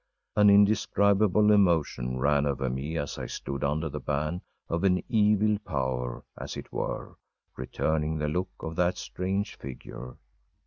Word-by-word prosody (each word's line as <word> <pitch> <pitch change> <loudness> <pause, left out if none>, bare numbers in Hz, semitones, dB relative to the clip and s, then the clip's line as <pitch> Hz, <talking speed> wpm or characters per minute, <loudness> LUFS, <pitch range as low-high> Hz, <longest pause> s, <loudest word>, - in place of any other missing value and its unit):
An 105 -1 +6
indescribable 100 0 +4
emotion 80 -11 +2
ran 70 +2 +2
over 65 -2 -1
me 70 +6 -3
as 70 -1 -4
I - - -4
stood 70 -1 -5
under 75 +3 0
the 75 -1 -5
ban 75 +5 -2 0.3
of 85 +3 -2
an 90 -2 +3
evil 105 -1 +3
power, 65 - -3
as - - -6
it - - -9
were, - - -4 0.4
returning 75 +4 -1
the 75 0 -1
look 90 +5 -1
of 80 0 -5
that 90 0 +2
strange 95 +3 -3
figure. 60 -1 -9
80 Hz, 145 wpm, -28 LUFS, 70-100 Hz, 0.4 s, An